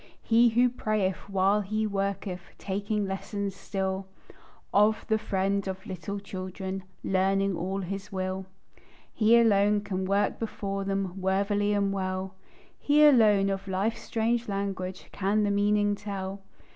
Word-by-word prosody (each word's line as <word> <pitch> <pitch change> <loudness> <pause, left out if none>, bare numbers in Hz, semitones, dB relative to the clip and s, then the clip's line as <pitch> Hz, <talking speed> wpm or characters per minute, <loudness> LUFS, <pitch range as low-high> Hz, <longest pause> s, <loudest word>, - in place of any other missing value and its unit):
He 235 +1 +5
who 240 +2 +4
prayeth 215 -6 -1
while 195 +2 +3
he 215 +2 -1
worketh, 195 -2 -2 0.2
Taking 205 +1 -2
lessons 195 0 -4
still 190 -1 -3 0.7
Of 210 +2 +3
the 220 0 +2
Friend 195 -1 -1
of 190 0 -5
little 190 +2 -5
children, 190 -1 -6 0.2
Learning 195 0 +1
all 190 +4 -2
His 195 +2 -5
will; 190 0 -3 0.7
He 225 +1 +5
alone 205 -2 +4
can 190 -2 -3
walk 200 +2 +1
before 195 -3 -3
them 195 -1 -2
Worthily 200 +2 +1
and 200 -1 +1
well; 185 0 -3 0.5
He 300 +1 +5
alone 210 -8 +5
of 195 0 -4
life's 195 +4 -1
strange 230 0 -1
language 195 -2 -3
Can 205 +2 +1
the 205 - +1
meaning 205 0 +2
tell. 195 -1 -5
195 Hz, 135 wpm, -28 LUFS, 190-210 Hz, 0.7 s, He